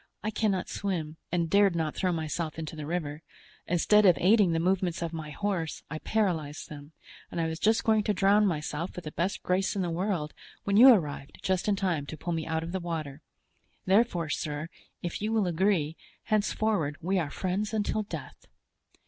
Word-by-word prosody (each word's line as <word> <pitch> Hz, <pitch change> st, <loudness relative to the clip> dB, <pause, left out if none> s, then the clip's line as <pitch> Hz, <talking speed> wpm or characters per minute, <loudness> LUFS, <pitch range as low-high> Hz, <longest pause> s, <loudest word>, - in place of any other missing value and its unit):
I 215 Hz, -, -1 dB
cannot 205 Hz, -4 st, 0 dB
swim, 165 Hz, -6 st, -3 dB
and 170 Hz, -2 st, +1 dB
dared 200 Hz, 0 st, +4 dB
not 160 Hz, -2 st, -1 dB
throw 185 Hz, -, 0 dB
myself 160 Hz, -1 st, -3 dB
into 160 Hz, 0 st, -5 dB
the 150 Hz, -2 st, -6 dB
river. 155 Hz, -3 st, -3 dB, 0.5 s
Instead 210 Hz, +5 st, +4 dB
of 180 Hz, -4 st, +6 dB
aiding 200 Hz, -1 st, +5 dB
the 165 Hz, -, +1 dB
movements 180 Hz, -1 st, 0 dB
of 170 Hz, 0 st, -4 dB
my 155 Hz, -2 st, -5 dB
horse, 170 Hz, -1 st, -3 dB
I 155 Hz, -, -4 dB
paralyzed 165 Hz, -10 st, -1 dB
them; 145 Hz, +1 st, -10 dB, 0.4 s
and -, -, -4 dB
I 165 Hz, -, +1 dB
was 160 Hz, 0 st, -3 dB
just 220 Hz, +1 st, +3 dB
going 220 Hz, -1 st, +3 dB
to 210 Hz, -, +2 dB
drown 200 Hz, +2 st, +4 dB
myself 155 Hz, 0 st, -3 dB
with 180 Hz, -, -7 dB
the 155 Hz, -, -5 dB
best 180 Hz, +6 st, -2 dB
grace 185 Hz, +2 st, +1 dB
in 195 Hz, -, 0 dB
the 175 Hz, -, -2 dB
world, 170 Hz, -3 st, -2 dB, 0.3 s
when 200 Hz, -, 0 dB
you 240 Hz, +5 st, +9 dB
arrived 150 Hz, -, 0 dB
just 185 Hz, +1 st, 0 dB
in 205 Hz, -, +3 dB
time 175 Hz, -7 st, -1 dB
to 155 Hz, -, -7 dB
pull 175 Hz, -, -3 dB
me 160 Hz, -1 st, -3 dB
out 160 Hz, 0 st, -1 dB
of 165 Hz, -, -5 dB
the 190 Hz, -, -2 dB
water; 160 Hz, -4 st, -5 dB, 0.6 s
therefore, 190 Hz, -5 st, +2 dB
sir, 150 Hz, +2 st, -3 dB, 0.3 s
if 175 Hz, +2 st, -4 dB
you 215 Hz, +1 st, -1 dB
will 220 Hz, -3 st, +2 dB
agree, 175 Hz, -3 st, +1 dB, 0.3 s
henceforward 210 Hz, -7 st, 0 dB
we 185 Hz, +3 st, +1 dB
are 155 Hz, -4 st, -2 dB
friends 195 Hz, +6 st, -2 dB
until 215 Hz, 0 st, 0 dB
death." 210 Hz, -, -8 dB
175 Hz, 195 wpm, -29 LUFS, 160-200 Hz, 0.6 s, you